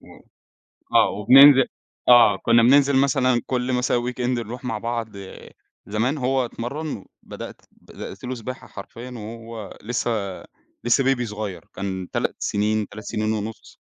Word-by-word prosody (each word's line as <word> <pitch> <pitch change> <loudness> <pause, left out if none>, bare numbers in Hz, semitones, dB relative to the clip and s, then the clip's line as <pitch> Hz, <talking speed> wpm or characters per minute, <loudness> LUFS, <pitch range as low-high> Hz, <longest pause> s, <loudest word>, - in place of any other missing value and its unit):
و - - -19 0.9
آه - - +6
وبننزل 135 +5 +7 0.4
آه 120 -5 +7
كنّا 115 +3 +3
بننزل 140 +2 +5
مثلًا 130 -2 +2
كل 125 0 -1
مثلًا 125 0 +1 0.2
weekend 125 - -12 0.2
نروح 120 +4 -7
مع 115 -3 -2
بعض 115 0 -3 0.8
زمان 115 +8 -1
هو 130 0 +1
اتمرّن، 125 +1 -5 0.2
بدأت - - -9
بدأت 100 - -11
له 130 - -3
سباحة 125 +2 -8
حرفيًا 115 +5 -10
وهو 115 -1 -9
لسه 120 +2 -2 0.7
لسه 120 +3 +3
baby 135 -2 +2
صغيّر 105 -5 -6
كان 95 -2 -4
3 - - -1
سنين، 105 0 -1
3 110 +1 -10
سنين 110 0 -1
ونص، 110 +1 -6
120 Hz, 140 wpm, -23 LUFS, 110-130 Hz, 0.9 s, وبننزل